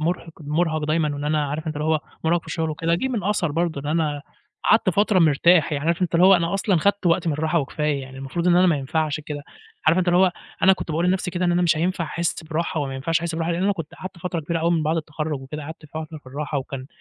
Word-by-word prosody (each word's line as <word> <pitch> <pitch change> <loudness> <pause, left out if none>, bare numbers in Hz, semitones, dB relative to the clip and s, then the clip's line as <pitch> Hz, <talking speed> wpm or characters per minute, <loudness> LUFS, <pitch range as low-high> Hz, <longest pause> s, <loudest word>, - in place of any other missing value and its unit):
مُرهِق 170 +1 -2
مُرهَق 155 +1 0
دايمًا 155 -1 +1
وإن 145 +1 -5
أنا 150 0 +1
عارف 155 +3 -4
أنت 155 -1 -3
اللي 150 - -2
هو 160 -1 +2 0.2
مُرهَق 170 +2 +2
في - - -22
الشغل 160 -2 -2
وكده، 165 +2 0
جِه 265 +10 -1
من 225 -7 -2
أثَر 195 -6 0
برضه 165 -2 -1
إن 145 - -7
أنا 150 -2 0 0.4
قعدت 215 -2 +4
فترة 200 +2 +3
مرتاح، 165 0 +4
يعني 145 0 -2
عارف 170 +2 +1
أنت 175 - -1
اللي 175 +2 +6
هو 195 - +8
أنا 170 +1 +1
أصلًا 195 -1 +1
خدت 200 +3 +1
وقتي 170 0 +2
من 155 - +1
الراحة 160 +3 +1
وكفاية، 145 0 -2
يعني 130 0 -10
المفروض 135 +6 -2
إن 175 - +5
أنا 180 +1 +5
ما 170 -4 +3
ينفعش 155 +2 -1
كده. 150 -1 -6 0.4
عارف 170 - +5
أنت 185 -1 +1
اللي 175 0 +4
هو 185 -1 +4 0.3
أنا 190 - +7
كنت 185 - -4
باقول 165 +3 0
لنفسي 180 0 0
كده 180 0 -2
إن 175 - +3
أنا 175 +1 +2
مش 165 -2 +3
هينفع 175 +2 0
أحس 170 +2 -2
براحة 160 0 -2
وما 135 -2 -3
ينفعش 155 +5 0
أحس 170 -1 -3
براحة، 165 +1 -1
لأن 175 +2 -1
أنا 205 - +3
كنت 165 -5 -7
قعدت 185 -1 -9
فترة 175 0 -3
كبيرة 165 +2 -2
أوي 165 +1 +2
من 165 -2 +2
بعد 155 +2 +1
التخرج 155 -2 -3
وكد، 135 +3 -7
ه 155 - -6
قعدت 155 +1 -9
فترة 155 +1 -7
في 145 - -28
الراحة، 145 +2 -3
وكان 130 0 -6
160 Hz, 270 wpm, -23 LUFS, 150-175 Hz, 0.4 s, هو